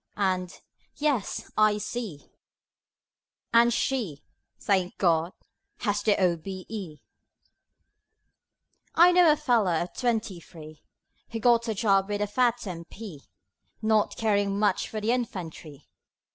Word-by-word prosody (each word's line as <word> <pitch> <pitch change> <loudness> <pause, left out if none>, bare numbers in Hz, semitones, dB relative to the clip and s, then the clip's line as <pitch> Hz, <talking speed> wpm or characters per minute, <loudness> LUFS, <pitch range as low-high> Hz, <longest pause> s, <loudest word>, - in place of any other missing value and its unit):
and 185 -2 -1 0.3
"Yes, 285 -8 -1
I 215 -1 +4
see" 210 -8 -6 1.2
And 235 +1 +6
she 225 - -2 0.4
thank 190 -4 0
God! 170 -1 +2 0.5
has 205 -2 0
the 210 -1 +2
O.B.E. 185 -2 -3 1.9
I 345 +2 +7
know 355 -3 +6
a 300 - +2
fellow 235 - +2
of 175 +2 -2
twenty 225 -7 -1
three, 155 -3 -13 0.5
Who 225 - -4
got 235 0 +3
a 220 - -1
job 195 -2 +2
with 205 0 -1
a - - +2
fat 240 +3 +1
M.P. 175 -2 -8 0.6
(Not 215 -1 +2
caring 205 -3 +1
much 210 0 +1
for 215 - -4
the 215 +2 0
Infantry.) 170 - -5
205 Hz, 115 wpm, -27 LUFS, 180-230 Hz, 1.9 s, I